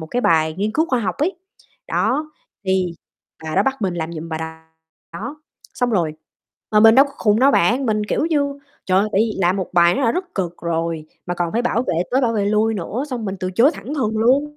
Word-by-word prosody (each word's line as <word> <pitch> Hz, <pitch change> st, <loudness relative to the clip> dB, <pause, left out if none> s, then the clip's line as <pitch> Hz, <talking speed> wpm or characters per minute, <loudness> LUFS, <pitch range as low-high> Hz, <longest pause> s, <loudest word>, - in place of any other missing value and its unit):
một 160 Hz, -, -6 dB
cái 245 Hz, +9 st, -1 dB
bài 160 Hz, -7 st, +2 dB
nghiên 205 Hz, +4 st, -2 dB
cứu 315 Hz, +6 st, +1 dB
khoa 255 Hz, -2 st, +1 dB
học 210 Hz, -, -2 dB
ấy, 335 Hz, +7 st, 0 dB, 0.5 s
đó, 305 Hz, +1 st, 0 dB, 0.3 s
thì 185 Hz, -2 st, 0 dB, 0.5 s
bà 155 Hz, 0 st, -4 dB
đó 195 Hz, -, +5 dB
bắt 265 Hz, 0 st, -1 dB
mình 185 Hz, -3 st, 0 dB
làm 165 Hz, -1 st, -4 dB
giùm 165 Hz, 0 st, -6 dB
bà 160 Hz, -, -3 dB, 0.7 s
đó. 290 Hz, -, -7 dB, 0.3 s
Xong 245 Hz, -1 st, 0 dB
rồi 170 Hz, -8 st, +1 dB, 0.6 s
mà 210 Hz, -, +5 dB
mình 225 Hz, +1 st, +8 dB
đâu 270 Hz, +2 st, +7 dB
có 280 Hz, -, -10 dB
khùng 210 Hz, -1 st, +3 dB
đâu 275 Hz, +2 st, +6 dB
bạn, 250 Hz, +4 st, +2 dB
mình, 215 Hz, -1 st, 0 dB
kiểu 255 Hz, -, 0 dB
như, 285 Hz, -3 st, 0 dB, 0.3 s
trời 185 Hz, 0 st, +3 dB
ơi, 205 Hz, +2 st, +2 dB
tại 195 Hz, -, +3 dB
vì 220 Hz, -2 st, 0 dB
làm 180 Hz, +1 st, +2 dB
một 190 Hz, -3 st, -3 dB
bài 170 Hz, -1 st, +5 dB
nó 275 Hz, -, -1 dB
đã 230 Hz, -, +3 dB
rất 360 Hz, 0 st, -4 dB
cực 175 Hz, -3 st, -2 dB
rồi, 165 Hz, -2 st, -2 dB, 0.2 s
mà 175 Hz, -, -2 dB
còn 175 Hz, -1 st, -2 dB
phải 235 Hz, -, 0 dB
bảo 240 Hz, -1 st, +1 dB
vệ 255 Hz, -, -2 dB, 0.2 s
tới 260 Hz, -, +2 dB
bảo 240 Hz, -3 st, +1 dB
vệ 210 Hz, -3 st, 0 dB
lui 215 Hz, +2 st, +2 dB
nữa, 210 Hz, +7 st, -3 dB
xong 245 Hz, -3 st, -3 dB
mình 195 Hz, -1 st, -3 dB
từ 185 Hz, -1 st, -2 dB
chối 245 Hz, +9 st, +5 dB
thẳng 225 Hz, +10 st, -6 dB
thừng 220 Hz, -7 st, -1 dB
luôn. 280 Hz, +6 st, +2 dB
215 Hz, 245 wpm, -20 LUFS, 175-260 Hz, 0.7 s, mình